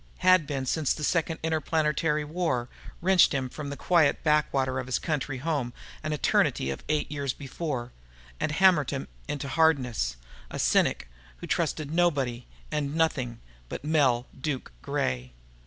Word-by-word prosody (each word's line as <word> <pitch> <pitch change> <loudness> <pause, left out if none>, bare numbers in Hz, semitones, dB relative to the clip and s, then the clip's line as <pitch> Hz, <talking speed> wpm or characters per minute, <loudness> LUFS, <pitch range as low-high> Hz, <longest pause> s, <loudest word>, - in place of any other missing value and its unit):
Had 185 -5 +6
been 135 -2 -2
since 150 +2 +1
the 150 - -6
Second 165 +1 0
Interplanetary 155 -1 +1
War 150 -6 -1 0.3
wrenched 185 -5 +5
him 130 -2 -1
from 145 +2 -6
the 140 - -5
quiet 170 -5 +3
backwater 135 -4 +2
of 130 - -5
his 130 - +1
country 145 -4 -2
home 135 -4 -2 0.3
an 155 - -3
eternity 130 - +2
of 65 - -6
eight 150 -1 0
years 140 -3 -2
before 135 -3 -4 0.5
and - - 0
hammered 175 -3 +4
him 135 -1 -3 0.2
into 145 -2 -3
hardness 130 - +2 0.3
a - - -6
cynic 60 - +2 0.3
who - - -8
trusted 150 -2 -1
nobody 135 -9 +1 0.2
and 150 -1 -1
nothing 130 -8 0 0.3
but - - -6
Mel 135 -6 +3
'Duke' 135 -1 -4
Gray. 65 0 -2
145 Hz, 150 wpm, -28 LUFS, 130-160 Hz, 0.5 s, Had